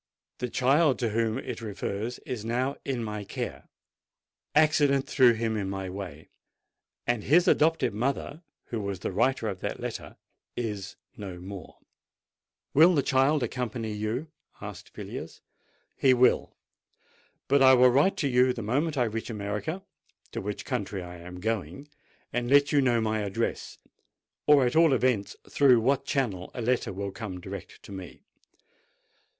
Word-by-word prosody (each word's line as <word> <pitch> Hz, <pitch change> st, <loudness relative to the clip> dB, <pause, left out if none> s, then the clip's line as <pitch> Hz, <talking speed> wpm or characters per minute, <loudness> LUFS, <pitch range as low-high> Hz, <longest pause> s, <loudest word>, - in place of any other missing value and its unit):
"The 125 Hz, -, -2 dB
child 135 Hz, +4 st, +3 dB
to 115 Hz, -, 0 dB
whom 110 Hz, +1 st, 0 dB
it 130 Hz, -, -5 dB
refers 105 Hz, +2 st, -4 dB
is 120 Hz, -5 st, -4 dB
now 125 Hz, +5 st, -1 dB
in 130 Hz, -4 st, -2 dB
my 105 Hz, -1 st, -4 dB
care: 100 Hz, -, -6 dB, 0.9 s
accident 145 Hz, -3 st, +4 dB
threw 125 Hz, -3 st, +5 dB
him 115 Hz, 0 st, -1 dB
in 100 Hz, -3 st, -2 dB
my 95 Hz, -1 st, -4 dB
way—and 100 Hz, +5 st, -7 dB
his 175 Hz, +6 st, +4 dB
adopted 160 Hz, -7 st, +3 dB
mother, 140 Hz, +7 st, -2 dB, 0.3 s
who 115 Hz, -2 st, -3 dB
was 100 Hz, -3 st, -4 dB
the -, -, -2 dB
writer 115 Hz, +4 st, +1 dB
of 95 Hz, -3 st, -4 dB
that -, -, -4 dB
letter, -, -, -6 dB, 0.4 s
is 105 Hz, -5 st, -4 dB, 0.2 s
no 95 Hz, -4 st, -7 dB
more." 95 Hz, -1 st, -9 dB, 1.0 s
"Will 165 Hz, +5 st, +7 dB
the 140 Hz, -, +2 dB
child 135 Hz, +2 st, +3 dB
accompany 115 Hz, -2 st, -3 dB
you?" 110 Hz, +9 st, -3 dB, 0.3 s
asked -, -, -9 dB
Villiers. -, -, -7 dB, 0.5 s
"He 130 Hz, -2 st, +4 dB
will. 125 Hz, +1 st, +2 dB, 0.9 s
But 140 Hz, 0 st, +4 dB
I 130 Hz, -1 st, +8 dB
will 125 Hz, 0 st, +6 dB
write 145 Hz, +10 st, +3 dB
to 145 Hz, -, 0 dB
you 125 Hz, 0 st, +4 dB
the 115 Hz, -, -6 dB
moment 145 Hz, +8 st, 0 dB
I 125 Hz, -, +3 dB
reach 115 Hz, 0 st, -3 dB
America—to 105 Hz, -, -6 dB
which 105 Hz, +1 st, -5 dB
country 100 Hz, -2 st, -3 dB
I 90 Hz, 0 st, -9 dB
am 90 Hz, +1 st, -10 dB
going—and 120 Hz, -, -5 dB
let 140 Hz, +1 st, +5 dB
you 145 Hz, -, +4 dB
know 120 Hz, -3 st, +2 dB
my 110 Hz, 0 st, 0 dB
address, 105 Hz, +3 st, -3 dB, 0.7 s
or 145 Hz, -3 st, +6 dB
at 125 Hz, -, 0 dB
all 165 Hz, -3 st, +6 dB
events 120 Hz, -5 st, +1 dB
through 130 Hz, -4 st, +5 dB
what 135 Hz, +4 st, +1 dB
channel 105 Hz, -10 st, -1 dB
a 125 Hz, -, -3 dB
letter 125 Hz, -2 st, 0 dB
will 100 Hz, +1 st, -4 dB
come 95 Hz, -2 st, -6 dB
direct 95 Hz, 0 st, -9 dB
to -, -, -12 dB
me. 95 Hz, -3 st, -9 dB
120 Hz, 150 wpm, -28 LUFS, 100-135 Hz, 1.0 s, I